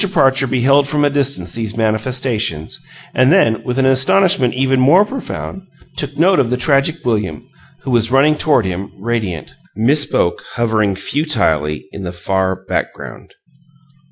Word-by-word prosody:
Parcher 135 Hz, -5 st, +2 dB
beheld 135 Hz, +3 st, +2 dB
from 145 Hz, 0 st, +1 dB
a 145 Hz, -, +1 dB
distance 135 Hz, -11 st, -1 dB
these 110 Hz, -1 st, -4 dB
manifestations, 110 Hz, -, -1 dB, 0.3 s
and 130 Hz, +2 st, +3 dB
then, 115 Hz, -12 st, +3 dB
with 125 Hz, 0 st, -3 dB
an 135 Hz, -, +2 dB
astonishment 130 Hz, 0 st, +3 dB
even 135 Hz, 0 st, +1 dB
more 165 Hz, +11 st, +5 dB
profound, 225 Hz, -5 st, -6 dB, 0.3 s
took 145 Hz, -1 st, -3 dB
note 180 Hz, +2 st, +3 dB
of 125 Hz, -4 st, +1 dB
the 125 Hz, -, -1 dB
tragic 140 Hz, +3 st, +1 dB
William, 105 Hz, -10 st, -2 dB, 0.4 s
who 130 Hz, -, -4 dB
was 115 Hz, -2 st, +2 dB
running 140 Hz, +4 st, +3 dB
toward 145 Hz, -8 st, +2 dB
him, 95 Hz, +1 st, -4 dB
radiant 100 Hz, -, -4 dB, 0.2 s
Miss 135 Hz, +8 st, +2 dB
Boke 85 Hz, -, -1 dB
hovering 110 Hz, -4 st, 0 dB
futilely 95 Hz, -, -1 dB
in 100 Hz, -, -9 dB
the 90 Hz, -2 st, -5 dB
far 95 Hz, +1 st, -2 dB
background. -, -, -6 dB
125 Hz, 150 wpm, -16 LUFS, 100-140 Hz, 0.4 s, more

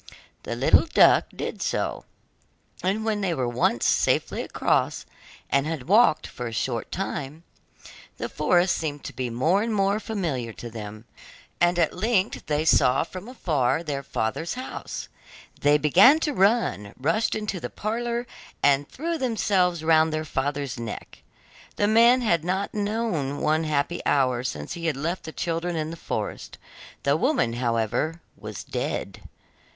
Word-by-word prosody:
The -, -, -4 dB
good -, -, -8 dB
little -, -, +5 dB
duck -, -, +6 dB
did -, -, -6 dB
so, -, -, -2 dB, 0.8 s
and 200 Hz, +5 st, -1 dB
when 215 Hz, -2 st, 0 dB
they 180 Hz, -4 st, 0 dB
were 130 Hz, -4 st, -1 dB
once 120 Hz, -1 st, +1 dB
safely -, -, +2 dB
across -, -, 0 dB, 0.4 s
and 140 Hz, +2 st, +1 dB
had 155 Hz, -5 st, -4 dB
walked 210 Hz, -4 st, +4 dB
for 125 Hz, -, -6 dB
a -, -, -5 dB
short 115 Hz, +1 st, -2 dB
time, 155 Hz, -4 st, -4 dB, 0.7 s
the -, -, -3 dB
forest 180 Hz, 0 st, +2 dB
seemed 145 Hz, -3 st, -4 dB
to -, -, -7 dB
be 130 Hz, -2 st, -3 dB
more 155 Hz, -, +2 dB
and 230 Hz, +1 st, -1 dB
more 200 Hz, 0 st, +1 dB
familiar 160 Hz, -, -3 dB
to 120 Hz, +1 st, -9 dB
them, 110 Hz, 0 st, -8 dB, 0.5 s
and 175 Hz, 0 st, +3 dB
at 170 Hz, -3 st, +2 dB
length 210 Hz, 0 st, 0 dB
they 150 Hz, +1 st, 0 dB
saw 130 Hz, -4 st, +4 dB
from 185 Hz, +5 st, -9 dB
afar 160 Hz, -, 0 dB
their 145 Hz, -4 st, -3 dB
father's 140 Hz, -, -3 dB
house. 255 Hz, +1 st, -6 dB, 0.5 s
Then 145 Hz, 0 st, +4 dB
they -, -, +6 dB
began 185 Hz, -, +6 dB
to 300 Hz, -, 0 dB
run, 195 Hz, -, +1 dB
rushed 215 Hz, -, +1 dB
into 210 Hz, -3 st, -3 dB
the -, -, -5 dB
parlour, 235 Hz, +3 st, -2 dB, 0.4 s
and 145 Hz, 0 st, +3 dB
threw 330 Hz, +3 st, -3 dB
themselves 190 Hz, -8 st, +1 dB
round 160 Hz, 0 st, +4 dB
their 155 Hz, 0 st, -2 dB
father's 140 Hz, -3 st, -2 dB
neck. 115 Hz, -2 st, -7 dB, 0.5 s
The 205 Hz, -, +1 dB
man 235 Hz, +4 st, +5 dB
had 170 Hz, -9 st, +1 dB
not 190 Hz, +3 st, -2 dB
known 205 Hz, -10 st, -1 dB
one 155 Hz, +1 st, +1 dB
happy 155 Hz, +2 st, -1 dB
hour 130 Hz, -3 st, +2 dB
since 75 Hz, -12 st, -4 dB
he 170 Hz, -1 st, -4 dB
had 150 Hz, -4 st, 0 dB
left 170 Hz, +6 st, -3 dB
the 160 Hz, -, -6 dB
children 170 Hz, +1 st, -2 dB
in 155 Hz, 0 st, -2 dB
the -, -, -6 dB
forest; -, -, -5 dB, 0.5 s
the 140 Hz, +1 st, +3 dB
woman, 245 Hz, -, +1 dB
however, 120 Hz, +6 st, -1 dB, 0.2 s
was 105 Hz, -1 st, -8 dB
dead. -, -, -4 dB
160 Hz, 160 wpm, -25 LUFS, 135-200 Hz, 0.8 s, duck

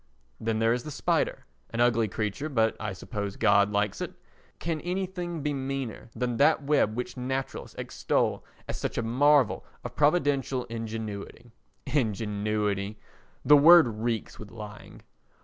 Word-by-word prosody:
Then 110 Hz, 0 st, -1 dB
there 115 Hz, +1 st, +3 dB
is 125 Hz, -, -1 dB
the 150 Hz, -, -8 dB
spider—an 65 Hz, -, -2 dB
ugly 120 Hz, -2 st, +3 dB
creature, 110 Hz, +9 st, -3 dB
but 115 Hz, -5 st, +2 dB
I 110 Hz, -1 st, -3 dB
suppose 100 Hz, +1 st, -5 dB
God 100 Hz, -2 st, +4 dB
likes 105 Hz, -1 st, 0 dB
it—can 160 Hz, -2 st, -6 dB
anything 180 Hz, -3 st, -3 dB
be 150 Hz, -1 st, 0 dB
meaner 135 Hz, -4 st, -4 dB
than 125 Hz, -2 st, -1 dB
that 140 Hz, -, +4 dB
web 140 Hz, -7 st, +2 dB
which 125 Hz, +1 st, -4 dB
naturalists 130 Hz, +2 st, -4 dB
extol -, -, -1 dB, 0.2 s
as -, -, -4 dB
such -, -, -3 dB
a -, -, 0 dB
marvel 135 Hz, +2 st, +3 dB, 0.2 s
of -, -, -7 dB
Providential 145 Hz, -4 st, +2 dB
ingenuity? 115 Hz, 0 st, -6 dB, 0.3 s
Ingenuity! 105 Hz, -5 st, -1 dB, 0.5 s
The 150 Hz, -, +8 dB
word 145 Hz, -7 st, +7 dB
reeks 115 Hz, -1 st, -2 dB
with 105 Hz, -, -9 dB
lying. 105 Hz, -1 st, -10 dB
115 Hz, 135 wpm, -28 LUFS, 105-140 Hz, 0.5 s, The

